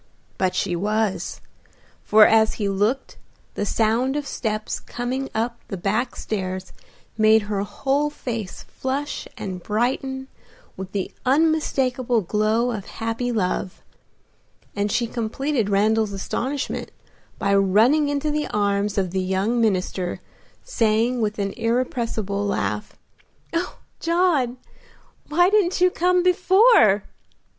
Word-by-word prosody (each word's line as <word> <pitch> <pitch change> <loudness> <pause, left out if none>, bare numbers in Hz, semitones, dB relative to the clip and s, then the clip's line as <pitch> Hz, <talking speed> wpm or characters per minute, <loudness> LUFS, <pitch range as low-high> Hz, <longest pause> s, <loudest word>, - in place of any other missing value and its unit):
But 185 -1 +1
she 180 -2 0
was, 210 +2 -1 0.6
for 215 0 +7
as 220 0 +4
he 205 - -1
looked 210 +7 -1 0.4
the 205 - -2
sound 230 +6 +1
of 295 -1 -2
steps 215 -5 -3
coming 255 +3 -4
up 235 +2 -1
the 195 - -5
back 215 +7 -1
stairs 185 -3 -4 0.5
made 220 0 +5
her 205 -1 -2
whole 275 +8 0
face 230 -9 -5
flush 275 +3 -4
and 185 -2 -5
brighten 265 +6 -1 0.5
with 190 0 -7
the 200 -2 -3
unmistakable 260 -5 +2
glow 215 +5 +1
of 210 -4 -5
happy 225 +2 -2
love, 190 -3 -2 0.9
and 205 0 0
she 240 +1 +1
completed 235 +1 -2
Randal's 210 +1 +2
astonishment 260 +8 -3 0.5
by 200 - +1
running 220 +10 +4
into 290 +1 -1
the 300 0 -1
arms 205 0 0
of 185 -3 0
the 190 0 0
young 190 +6 0
minister, 185 -4 0 0.4
saying 235 - +1
with 215 -1 -1
an 200 -1 -1
irrepressible 230 -4 -1
laugh, 105 - -2 0.6
"Oh, 340 +2 -2 0.2
John, 330 -8 +1 0.7
why 350 +5 +4
didn't 395 -4 +2
you 365 0 +4
come 360 +1 +2
before?" 365 - +5
225 Hz, 120 wpm, -23 LUFS, 200-265 Hz, 0.9 s, for